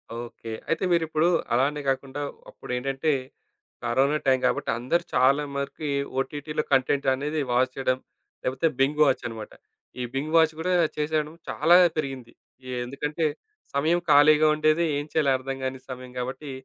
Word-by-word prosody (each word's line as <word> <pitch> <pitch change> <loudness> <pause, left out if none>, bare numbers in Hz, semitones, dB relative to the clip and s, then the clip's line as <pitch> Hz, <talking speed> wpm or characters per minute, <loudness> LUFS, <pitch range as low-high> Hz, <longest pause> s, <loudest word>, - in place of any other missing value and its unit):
Okay. 115 -1 -7 0.2
అయితే 165 - 0
మీరిప్పుడు 160 -1 +2 0.3
అలానే 145 +4 +1
గాకుండా 135 +1 -2 0.3
అప్పుడేంటంటే 135 +4 -2 0.7
కరోనా 135 +5 +2
టైం 130 -1 +4
గాబట్టి - - 0
అందరూ 170 +8 0
చాలా 140 +3 +4
మరికి 140 +2 -4 0.3
ఓటీటీలో 150 +2 -3
కంటెంట్ 135 +1 +2
అనేది 150 +3 -2
వాచ్ 130 +1 +2
చేయడం 130 -1 0 0.5
లేపోతే 130 +5 +1
బింగ్ 145 +3 +2
వాచన్నమాట. 115 -5 -2 0.5
ఈ 125 - -1
బింగ్ 150 +4 -3
వాచ్ 160 -1 +5
గూడా 180 +3 -1 0.3
చేసేయడం 150 0 -1 0.2
చాలా 165 +4 +4 0.2
పెరిగింది. 135 -5 -4 0.3
ఎ 130 - -5
ఎందుకంటే 150 +5 -2 0.5
సమయం 160 +5 +2
ఖాళీగా 150 +1 +6
ఉండేది. 155 +2 +2
ఏం 145 - -3
చేయాలో 150 -4 +2
అర్థం 135 +1 -5
గాని 130 0 -3
సమయం 125 0 -8
గాబట్టి 130 +3 -5
140 Hz, 135 wpm, -25 LUFS, 130-155 Hz, 0.7 s, ఖాళీగా